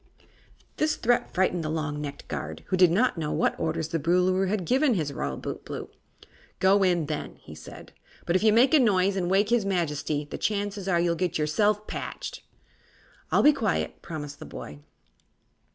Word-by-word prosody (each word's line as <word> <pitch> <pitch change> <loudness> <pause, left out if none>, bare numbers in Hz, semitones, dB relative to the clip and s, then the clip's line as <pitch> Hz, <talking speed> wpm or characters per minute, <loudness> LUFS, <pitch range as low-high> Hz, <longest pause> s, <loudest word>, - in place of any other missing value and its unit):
This 310 0 +1
threat 240 +1 +1
frightened 180 -2 +1
the 155 - -3
long 155 -2 -2
necked 145 -1 -7
guard, - - -5
who 185 - +2
did 180 -1 +6
not 200 +2 +2
know 150 -2 -2
what - - +1
orders 160 0 -2
the 165 - -1
Boolooroo 180 +4 +2
had 195 -2 -1
given 260 - +3
his 150 -6 -2
Royal - - -3
Bootblue. - - -6 0.7
"Go 195 +2 +4
in, 175 -4 +2
then," 150 0 -5 0.2
said 75 0 -12
he; - - -35 0.2
"but 170 - 0
if 185 - +3
you 215 0 +5
make 245 +6 +4
a 310 - +7
noise 200 -5 +3
and 180 -2 -1
waken 205 +4 +2
his 225 - -2
Majesty, 155 -6 -1
the - - -5
chances 205 -2 -2
are 175 -3 +2
you'll 170 0 +2
get 175 0 -1
yourself 205 +8 +1
patched." - - -6 0.9
"I'll - - +4
be 300 - +7
quiet," 225 -9 -2
promised 145 -3 -7
the - - -8
boy. 75 0 -9
180 Hz, 185 wpm, -26 LUFS, 155-205 Hz, 0.9 s, a